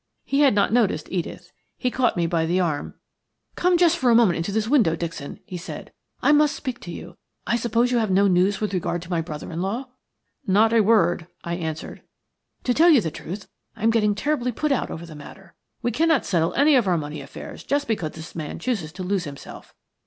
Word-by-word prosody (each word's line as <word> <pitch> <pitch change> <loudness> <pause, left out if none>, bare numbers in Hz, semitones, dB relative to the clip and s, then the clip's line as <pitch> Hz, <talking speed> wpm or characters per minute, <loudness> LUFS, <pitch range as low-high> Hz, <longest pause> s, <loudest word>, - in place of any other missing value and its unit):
He 275 - 0
had 275 -7 +5
not 205 +1 +2
noticed 210 -10 +1
Edith. 175 -3 -4 0.3
He 250 - -1
caught 245 -6 +1
me 170 - +1
by 165 -1 0
the 180 +3 +1
arm. 155 -5 -2 0.6
"Come 360 0 +2
just 345 -1 +4
for 255 - +2
a 235 - +6
minute 225 -7 +5
into 170 +4 -2
this 215 +1 0
window, 230 - +3
Dixon," 165 -4 -6
he 185 -5 -6
said. 175 - -8 0.3
"I - - +5
must 300 0 +4
speak 255 -3 -5
to 175 - -8
you. - - -9 0.3
I - - +1
suppose 235 +1 +1
you 245 - +3
have 220 -2 0
no 195 +2 +4
news 190 +2 +2
with 210 -2 -2
regard 175 -1 -2
to 180 - -11
my 170 -2 +1
brother 155 -1 -7
in 165 +1 -3
law?" 230 +8 -3 0.6
"Not 215 +4 +4
a 230 - +5
word," 175 -6 +3 0.2
I 170 - -3
answered. 160 -2 -5 0.6
"To 250 - +1
tell 330 +6 +5
you 300 -6 +7
the 160 - -3
truth, 185 +6 -7 0.3
I - - -10
am 225 - +4
getting 210 -2 +2
terribly 250 +1 -1
put 300 +6 -1
out 275 - 0
over 170 - -6
the 165 - -11
matter. 170 +5 -13 0.3
We 240 - +1
cannot 320 +3 +2
settle 170 -2 0
any 290 +2 +5
of 245 -7 +4
our 180 -2 +3
money 150 -1 -5
affairs 140 - -9
just 285 0 -1
because 175 -9 -2
this 160 -1 -10
man 155 -3 -5
chooses 200 -12 -2
to 185 0 -6
lose 185 -1 -1
himself. 140 -1 -10
200 Hz, 225 wpm, -23 LUFS, 170-245 Hz, 0.6 s, you